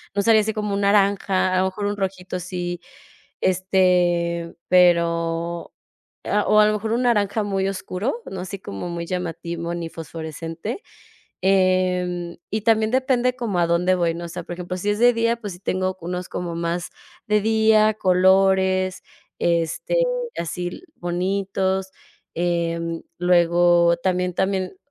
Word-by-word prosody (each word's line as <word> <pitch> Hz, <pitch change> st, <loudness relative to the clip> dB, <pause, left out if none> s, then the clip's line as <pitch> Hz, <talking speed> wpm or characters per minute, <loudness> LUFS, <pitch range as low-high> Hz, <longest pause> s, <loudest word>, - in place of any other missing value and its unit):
no 200 Hz, -, +2 dB
saldría 220 Hz, 0 st, +5 dB
así 220 Hz, +1 st, -2 dB
con 210 Hz, -1 st, -3 dB
un 200 Hz, -, -1 dB
naranja, 200 Hz, -2 st, +2 dB
a 185 Hz, -, +3 dB
lo 185 Hz, -, +2 dB
mejor 190 Hz, +2 st, -3 dB
un 205 Hz, 0 st, -2 dB
rojito 185 Hz, -2 st, -3 dB
sí, 175 Hz, -1 st, -4 dB, 0.6 s
este, 180 Hz, -2 st, +1 dB
pero 170 Hz, -1 st, +2 dB, 0.5 s
a 210 Hz, -, +1 dB
o 215 Hz, -, +5 dB
a 210 Hz, -, +6 dB
lo 215 Hz, -, +2 dB
mejor 220 Hz, +1 st, -3 dB
un 240 Hz, +2 st, +1 dB
naranja 215 Hz, -3 st, +2 dB
muy 195 Hz, -1 st, -1 dB
oscuro, 195 Hz, -, -3 dB
no 190 Hz, -, -5 dB
así 190 Hz, +2 st, -6 dB
como 100 Hz, -, -6 dB
muy 170 Hz, 0 st, -4 dB
llamativo 170 Hz, -1 st, -4 dB
ni 170 Hz, -1 st, -4 dB
fosforescente. 165 Hz, -, -6 dB, 0.6 s
Em, 185 Hz, -2 st, +1 dB
eh, -, -, -22 dB
y 215 Hz, +1 st, -2 dB
también 220 Hz, -1 st, +3 dB
depende 255 Hz, -1 st, +1 dB
como 220 Hz, -7 st, -2 dB
a 170 Hz, -, +3 dB
dónde 175 Hz, +2 st, +2 dB
voy, 170 Hz, -2 st, +1 dB
¿no? 170 Hz, +1 st, -6 dB
O -, -, -5 dB
sea, -, -, -6 dB
por -, -, -7 dB
ejemplo, 180 Hz, +1 st, -5 dB
si 200 Hz, +3 st, -2 dB
es 210 Hz, -, -2 dB
de 245 Hz, +1 st, +6 dB
día, 230 Hz, 0 st, +1 dB
pues 205 Hz, -5 st, -6 dB
sí 175 Hz, -, -12 dB
tengo 185 Hz, -1 st, -2 dB
unos 180 Hz, +1 st, -4 dB
como 175 Hz, -1 st, -4 dB
más 170 Hz, +1 st, -2 dB, 0.4 s
de 210 Hz, 0 st, +3 dB
día, 220 Hz, 0 st, +4 dB
colores, 190 Hz, 0 st, +3 dB, 0.4 s
este, 170 Hz, -, 0 dB, 0.4 s
así 175 Hz, +1 st, -3 dB
l 175 Hz, -, -7 dB
bonitos. 190 Hz, +1 st, -1 dB, 0.4 s
Em, 170 Hz, -1 st, -1 dB, 0.2 s
luego 175 Hz, -1 st, +4 dB
también 180 Hz, 0 st, -1 dB
también 190 Hz, -, -1 dB
185 Hz, 155 wpm, -22 LUFS, 175-200 Hz, 0.6 s, a